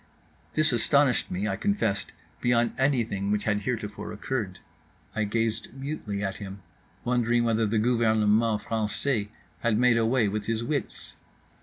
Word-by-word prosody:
This 155 -1 +3
astonished 135 +2 +3
me, 95 +4 -2
I 100 - 0
confessed, 155 - 0 0.3
beyond 120 -1 +2
anything 115 -8 0
which 105 0 +1
had 105 -1 +1
heretofore 105 -2 -4
occurred. 105 -3 -3 0.6
I 110 -1 +1
gazed 115 +1 -1
mutely 135 -8 -4
at 95 0 -3
him, 100 -2 -8 0.4
wondering 120 -1 +2
whether 115 -1 +2
the 110 +2 0
gouvernement 110 -1 +3
français 110 0 -1 0.3
had 115 -3 +1
made 125 0 +4
away 115 0 +3
with 105 +1 -3
his 115 0 0
wits. 140 +3 -3
115 Hz, 140 wpm, -27 LUFS, 105-120 Hz, 0.6 s, made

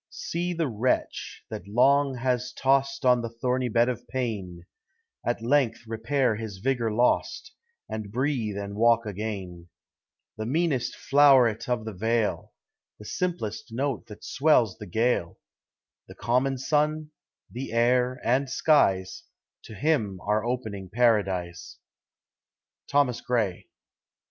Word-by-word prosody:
See 175 +1 -3
the 165 -2 -1
wretch, 120 +1 -2
that 85 - -7
long 135 +5 +3
has 125 0 -1
tost 135 +1 +1
On 125 -1 +5
the 115 - -4
thorny 125 +2 -1
bed 115 +2 +3
of 120 -2 -4
Pain, 100 -9 -4 0.6
At 120 -1 -2
length 125 -2 +1
repair 115 +1 0
his 110 -3 -6
vigor 120 +1 0
lost, 120 +3 0 0.3
And 110 -2 -6
breathe 120 -4 -1
and 100 0 -5
walk 115 +1 +3
again: 95 -4 -6 0.7
The 110 0 -4
meanest 150 -2 0
flow'r'et 135 -6 +4
of 120 -3 -1
the 110 - -5
vale, 110 +3 -1 0.5
The 105 - -13
simplest 170 - -3
note 130 0 -2
that 105 -2 -12
swells 130 -9 +2
the 105 - -8
gale, 110 -7 0 0.7
The - - -12
common 130 +3 0
Sun, 150 +3 0 0.4
the 125 +1 -6
air, 125 +2 +2
and 130 +2 +1
skies, 95 -11 +2 0.4
To 110 - -10
him 110 -7 0
are 105 +2 0
opening 110 -6 -4
Paradise. 95 -7 0 1.1
_Thomas 135 -4 +2
Gray. 110 -8 -1
120 Hz, 125 wpm, -26 LUFS, 105-135 Hz, 1.1 s, On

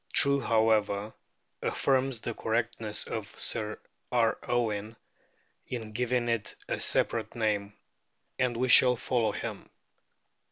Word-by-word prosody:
True, 140 -3 +5
however, 110 -3 +1 0.5
affirms 130 -3 0
the 120 - -3
correctness 115 -1 -1
of 110 -2 -4
Sir 110 0 0 0.3
R. 115 -2 +2
Owen 110 -2 -1 0.7
in 115 -4 -5
giving 125 +1 0
it 115 -3 -1
a - - -2
separate 110 0 0
name. 105 -3 -1 0.7
And 125 -2 +1
we 130 +2 +1
shall 125 0 +7
follow 120 -1 0
him. - - -6
115 Hz, 115 wpm, -29 LUFS, 110-125 Hz, 0.7 s, shall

